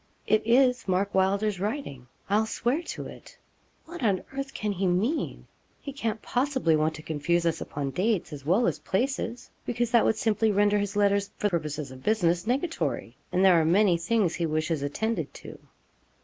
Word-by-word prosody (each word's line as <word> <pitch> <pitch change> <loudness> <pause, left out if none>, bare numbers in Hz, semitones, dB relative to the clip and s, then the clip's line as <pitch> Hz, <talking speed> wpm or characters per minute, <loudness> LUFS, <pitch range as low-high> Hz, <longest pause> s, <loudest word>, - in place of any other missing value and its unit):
'It 215 - +3
is 250 0 +3
Mark 190 +2 0
Wylder's 195 +1 +1
writing 200 - -4 0.2
I'll 215 +2 +2
swear 245 +7 0
to - - -6
it. - - -12 0.5
What 345 0 -9
on 200 -6 +1
earth 275 0 -4
can 210 -4 -2
he 190 -1 -1
mean? 210 - -1 0.3
He 280 - -7
can't 225 -5 -3
possibly 255 - +1
want 155 +1 +1
to 155 - -10
confuse 170 +3 0
us 165 - 0
upon 140 -2 -4
dates, 185 - 0
as 140 -2 -8
well 185 - +3
as - - 0
places, 245 +2 -2
because 240 -1 -1
that 235 - +5
would 220 - +2
simply 220 0 +2
render 205 +1 +3
his 205 0 -3
letters, 200 -1 +2
for 205 - 0
purposes 150 -4 -3
of 130 0 -11
business, 180 -2 +1
nugatory, 285 +7 -2 0.2
and 185 +2 +3
there 175 -3 +6
are - - +1
many 180 +3 +4
things 175 +1 +1
he 170 0 -1
wishes 155 0 -1
attended 220 +11 -2
to.' - - -10
200 Hz, 180 wpm, -27 LUFS, 170-230 Hz, 0.5 s, there